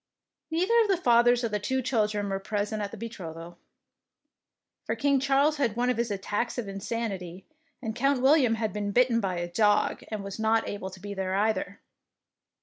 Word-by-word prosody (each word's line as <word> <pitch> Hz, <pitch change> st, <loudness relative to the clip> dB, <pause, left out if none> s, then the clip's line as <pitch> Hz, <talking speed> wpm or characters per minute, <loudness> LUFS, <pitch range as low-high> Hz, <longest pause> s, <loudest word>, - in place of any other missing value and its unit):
Neither 350 Hz, +7 st, +1 dB
of 445 Hz, -, +2 dB
the 390 Hz, -2 st, +2 dB
fathers 240 Hz, -4 st, +4 dB
of 230 Hz, -, -1 dB
the 210 Hz, -, 0 dB
two 260 Hz, +6 st, -1 dB
children 210 Hz, -4 st, 0 dB
was 195 Hz, 0 st, -2 dB
present 210 Hz, +1 st, -2 dB
at 205 Hz, -, -3 dB
the -, -, -9 dB
betrothal, 175 Hz, -6 st, -8 dB, 1.2 s
for -, -, -2 dB
King 280 Hz, -1 st, +2 dB
Charles 275 Hz, +3 st, +2 dB
had 240 Hz, -7 st, 0 dB
one 245 Hz, +1 st, +1 dB
of 250 Hz, -, -3 dB
his 235 Hz, 0 st, 0 dB
attacks 205 Hz, +4 st, -2 dB
of 240 Hz, -4 st, -3 dB
insanity, 195 Hz, -3 st, -4 dB, 0.4 s
and 220 Hz, -2 st, -3 dB
Count 275 Hz, +1 st, +2 dB
William 265 Hz, -3 st, +4 dB
had 220 Hz, -3 st, -2 dB
been 205 Hz, -1 st, -3 dB
bitten 245 Hz, 0 st, +4 dB
by 190 Hz, -4 st, -2 dB
a 175 Hz, 0 st, -2 dB
dog, 205 Hz, +4 st, +2 dB
and 215 Hz, -2 st, -5 dB
was 200 Hz, +2 st, -7 dB
not 220 Hz, +1 st, +2 dB
able 200 Hz, -2 st, -5 dB
to 190 Hz, 0 st, -12 dB
be 205 Hz, +2 st, -6 dB
there, 190 Hz, -1 st, -2 dB
either. 220 Hz, +8 st, -1 dB
220 Hz, 190 wpm, -27 LUFS, 200-245 Hz, 1.2 s, fathers